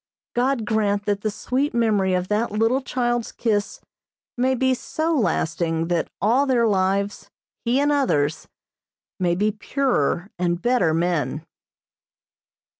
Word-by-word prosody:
God 245 -1 +1
grant 205 -2 0
that 205 -1 0
the 215 - 0
sweet 255 +6 -2
memory 205 -5 +2
of 180 0 -1
that 210 +3 0
little 225 +5 +1
child's 240 -2 -1
kiss 210 -3 -1 0.6
may 260 +2 +1
be 260 +1 +2
so 315 +5 -2
lasting 165 - 0
that 170 -2 0
all 245 +8 +2
their 245 -3 +3
lives, 200 0 0 0.4
he 240 +3 +2
and 290 +1 +2
others, 160 - +1 0.7
may 175 -2 +1
be 210 +4 +1
purer 210 - -1
and 175 -1 0
better 240 -7 +2
men. 160 -3 -1
210 Hz, 130 wpm, -23 LUFS, 180-250 Hz, 0.7 s, their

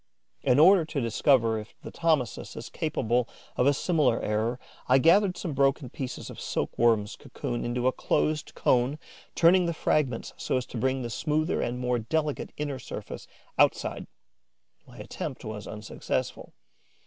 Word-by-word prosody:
In 125 - +3
order 175 +4 +7
to 155 -2 -3
discover 115 -1 +2
if 105 - -11
the - - -7
Thomisus 155 -8 0
is - - -7
capable 125 -6 -1 0.3
of 125 - +2
a - - +6
similar 155 -7 +2
error, 110 +4 -1 0.3
I 130 - +6
gathered 180 +6 +4
some 165 - -4
broken 135 -1 +1
pieces 130 -2 -6
of - - -10
silk - - -2
worm's 110 -3 +2
cocoon 120 - -5
into 120 +1 -2
a 130 - +4
closed 155 +3 -1
cone, 125 +4 +2 0.4
turning 175 +1 +5
the 170 - -2
fragments 135 -7 0
so - - -1
as 125 - -2
to 120 - -6
bring 130 +2 0
the 120 - -4
smoother 155 +6 0
and 120 +1 -2
more 125 -1 0
delicate 150 +6 -2
inner 145 -3 -3
surface - - -8 0.3
outside. - - +2 0.8
My - - -15
attempt - - -6
was 110 -1 -6
unsuccessful. 105 0 -4
130 Hz, 160 wpm, -27 LUFS, 120-155 Hz, 0.8 s, order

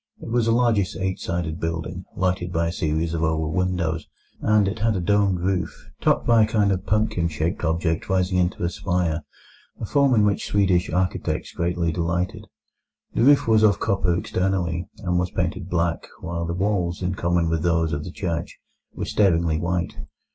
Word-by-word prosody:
It - - -8
was 115 0 +1
a - - +3
largish 115 -5 +2
eight 95 0 -2
sided 85 -1 -3
building, 80 +2 -4
lighted 90 -1 -1
by 85 -1 0
a - - -2
series 80 0 -1
of 80 - -2
oval 80 -1 0
windows, 85 -3 -1 0.3
and 105 -2 +3
it 105 +3 -3
had 110 0 +1
a - - 0
domed 100 0 +2
roof, 90 -2 -2
topped - - +2
by 115 -1 +5
a 110 - +4
kind 105 -3 +2
of 95 -1 -2
pumpkin 105 -5 +1
shaped 80 +4 -2
object 80 +1 0
rising 95 -1 +1
into 90 0 0
a 85 - +1
spire, 90 -5 -1 0.6
a - - -3
form 140 -3 +3
in 105 -2 +4
which 100 -1 0
Swedish 95 -3 +2
architects 90 0 -1
greatly 85 -1 -1
delighted. 85 +2 -2 0.7
The - - 0
roof 140 +1 +5
was 110 -1 +5
of 105 -4 +4
copper 90 -3 +1
externally, 90 -3 -1
and 90 -1 0
was 90 0 -1
painted 90 - -2
black, 85 -1 0
while 85 -2 -3
the 85 - -2
walls, 95 -2 -1
in 90 +1 0
common 85 -2 +1
with 80 -1 0
those 85 -2 +1
of 75 0 -2
the - - -6
church, 85 -4 -4 0.4
were - - -3
staringly 85 -5 +2
white. 85 +1 -2
90 Hz, 185 wpm, -23 LUFS, 85-100 Hz, 0.7 s, by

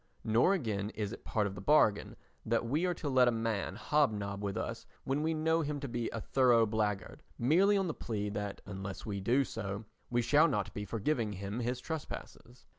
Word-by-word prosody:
Nor 115 - +4
again 105 - -2
is 105 -2 -2
it - - -10
part 105 -2 0
of 100 - -3
the 95 - -8
bargain 110 -4 +3 0.3
that 115 +1 0
we 150 +9 +1
are 180 - +1
to 160 - -5
let 130 -2 +5
a - - +5
man 115 -4 -2
hob 145 +4 +2
nob 100 -1 -4
with 100 -1 -2
us - - -4 0.2
when 135 +2 0
we 160 +1 0
know 160 +1 +2
him 145 -1 -2
to 140 - -4
be 120 -2 -2
a 115 - -4
thorough 120 -1 +4
blackguard, 110 +5 -2 0.2
merely 180 +11 +4
on 195 - +1
the 165 - -2
plea 105 -6 -3
that 105 -1 -4
unless 95 -1 -6
we 100 -2 -3
do 125 +8 +3
so 100 -3 -5 0.2
we 120 0 +1
shall 145 +7 +5
not 105 - -1
be 105 - -4
forgiving 115 +1 -1
him 100 +4 -4
his 125 +1 -1
trespasses. 130 -5 -7
115 Hz, 210 wpm, -32 LUFS, 105-145 Hz, 0.3 s, let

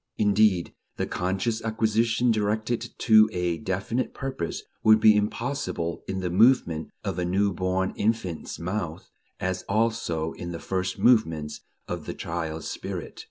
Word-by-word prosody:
Indeed, 105 -3 +3 0.2
the - - 0
conscious 95 +5 -1
acquisition 115 +2 +1
directed 110 +2 -1
to 110 -2 +6
a 90 -3 -1
definite 100 +9 -2
purpose 130 -11 -4 0.2
would 110 0 +7
be 110 0 +7
impossible 105 - -2
in 95 0 -3
the 90 -1 -2
movements 95 -6 +3
of 95 -3 -3
a - - 0
new 95 +3 +1
born 95 +1 -1
infant's 105 -6 -2
mouth, 90 -2 -4 0.3
as 95 0 -2
also 100 -7 0
in 85 0 -6
the 85 - -5
first 95 +1 -2
movements 80 -11 +2 0.3
of 85 -4 -5
the - - -4
child's 80 -1 -4
spirit. - - -6
95 Hz, 140 wpm, -26 LUFS, 85-110 Hz, 0.3 s, would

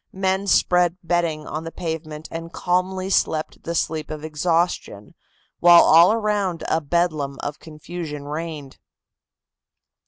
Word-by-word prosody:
Men 190 +1 -1
spread 180 -2 +3
bedding 165 -3 -1
on 155 +1 -5
the 165 - -6
pavement 160 -2 -6
and 165 0 -6
calmly 185 +2 -1
slept 155 -4 0
the 170 - -4
sleep 155 -2 -2
of 155 -1 -6
exhaustion, 160 - -1 0.5
while 175 0 +8
all 170 +4 +7
around 210 -6 -1
a 160 - +1
bedlam 155 -3 -1
of 145 0 -4
confusion 155 -1 -7
reigned. 150 -2 -6
165 Hz, 125 wpm, -22 LUFS, 155-180 Hz, 0.5 s, while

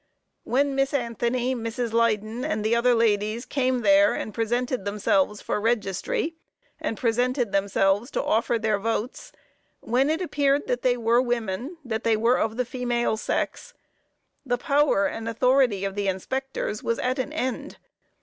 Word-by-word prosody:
When 280 +3 +1
Miss 270 +1 0
Anthony, 240 0 -1
Mrs. 230 -1 -3
Leyden 230 0 +1
and 215 0 -2
the 225 +2 +3
other 240 +1 +3
ladies 220 +1 +1
came 255 -2 0
there 200 -1 +5
and 215 - -5
presented 240 +1 -1
themselves 205 0 0
for 210 - -2
registry, 225 - -1 0.5
and 225 - -3
presented 245 0 0
themselves 195 +3 +1
to - - -2
offer 225 +1 +1
their 215 -2 0
votes, 225 +3 -3 0.5
when 255 +5 +1
it 320 +1 +1
appeared 290 -5 +1
that 245 0 -1
they 245 -1 +2
were 235 +1 +3
women 240 - -3
that 220 -2 -3
they 225 -1 +2
were 235 +3 +3
of 220 +1 -1
the 250 - 0
female 240 -2 -1
sex 485 - -3 0.7
the 245 -3 0
power 280 -6 +2
and 225 +2 -3
authority 245 -3 +2
of 195 - -3
the 200 0 -2
inspectors 215 +4 -3
was 230 - -1
at 255 +1 -1
an 260 +3 -2
end. 260 -5 -3
235 Hz, 160 wpm, -25 LUFS, 215-255 Hz, 0.7 s, there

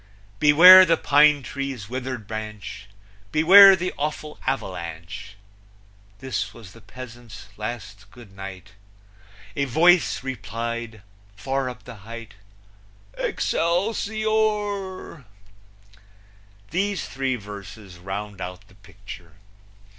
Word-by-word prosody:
"Beware 180 +6 +9
the 165 -2 +2
pine 145 -1 +4
tree's 135 -6 -5
withered 125 -2 -5
branch! 105 -2 -7 0.4
Beware 195 - +8
the 180 0 -4
awful 150 +1 -4
avalanche!" 90 -4 -5 0.8
This 130 +3 -4
was 110 -6 -13
the 115 - -16
peasant's 120 -3 -12
last 105 -3 -7
Good 110 -4 -16
night; 95 0 -9 0.9
A 140 - 0
voice 160 0 +3
replied, 115 -2 -5 0.3
far 135 +4 -2
up 125 -1 -11
the 125 -3 -11
height, 115 +2 -10 0.8
Excelsior! 205 - -1 1.5
These 195 +3 -1
three 130 -1 -2
verses 100 -3 -11
round 100 +1 -6
out 90 0 -8
the - - -20
picture. 95 -4 -12
120 Hz, 95 wpm, -23 LUFS, 105-155 Hz, 1.5 s, Beware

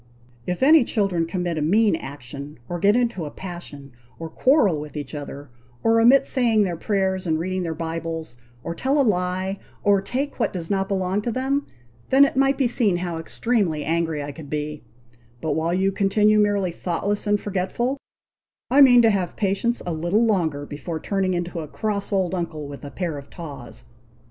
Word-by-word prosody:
If 180 +6 -1
any 305 0 +7
children 195 -8 0
commit 175 -2 -2
a - - -2
mean 205 +6 +3
action, 140 0 -8
or 175 - -4
get 205 +4 +4
into 235 -9 0
a - - -5
passion, 160 -6 -9 0.3
or 165 -1 -7
quarrel 210 - +3
with 150 0 -8
each 145 -1 -6
other, 145 -2 -7 0.3
or 225 0 +4
omit 255 +4 +6
saying 230 -5 +3
their 180 -3 -1
prayers 190 0 -1
and 160 -1 +1
reading 185 +3 -2
their 165 -2 -3
Bibles, 165 -2 -4 0.3
or 170 - -3
tell 270 - 0
a - - +5
lie, 185 0 -1 0.2
or 200 -1 +4
take 265 +8 -3
what - - +1
does 170 -2 -4
not 195 -1 +1
belong 190 0 0
to 235 - -2
them, 270 +4 -1 0.4
then 275 +2 +7
it 275 - -2
might 270 +1 +3
be 270 - +2
seen 230 -6 +2
how 175 -2 -3
extremely 175 -4 0
angry 160 -1 -1
I 145 - -5
could 145 0 -11
be; 150 0 -3 0.6
but 155 - -2
while 160 +3 0
you 190 +2 +2
continue 210 +2 +3
merely 205 -3 +2
thoughtless 190 +5 -2
and 205 0 +3
forgetful, 205 +8 -2 0.7
I 280 +2 +6
mean 245 -3 +8
to 225 - +5
have 190 -3 -1
patience 210 +4 0
a 175 - -2
little 175 +8 +1
longer 160 -9 0
before 160 +3 -5
turning 190 +1 -1
into 175 0 -3
a 155 - -5
cross 205 +6 -3
old 190 -2 +1
uncle 165 -5 -4
with 140 +1 -9
a 145 - -6
pair 165 -2 -4
of 140 - -14
tawse." 140 -8 -9
185 Hz, 190 wpm, -23 LUFS, 160-210 Hz, 0.7 s, mean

